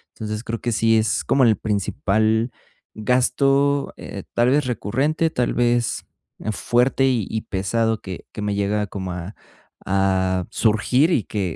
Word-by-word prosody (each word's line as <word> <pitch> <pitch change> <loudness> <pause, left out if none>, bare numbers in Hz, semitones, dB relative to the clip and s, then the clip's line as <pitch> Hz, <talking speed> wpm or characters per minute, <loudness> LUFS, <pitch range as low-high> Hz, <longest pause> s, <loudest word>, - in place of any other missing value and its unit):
Entonces, 110 +1 -5
creo 115 0 -4
que 120 - -1
sí 115 +1 +3
es 110 0 +1
como 135 -1 +2
el 110 -3 +4
principal 110 +3 0 0.4
gasto, 135 +4 +2
eh, - - -8
tal 120 +1 +3
vez, 145 0 +2
recurrente, 135 +8 0
tal 125 -6 -1
vez, 120 -2 +1 0.5
fuerte, 125 +5 +1
y 120 -7 0
y 110 - -2
pesado 110 +4 -1
que 95 -2 -8
que - - -6
me 105 -1 -1
llega 105 +1 0
como 95 -2 -5
a 90 +4 -7 0.5
a 95 -1 +1
surgir, 120 +8 +2
y 120 - +2
que, 95 -6 -3
110 Hz, 150 wpm, -22 LUFS, 100-125 Hz, 0.5 s, el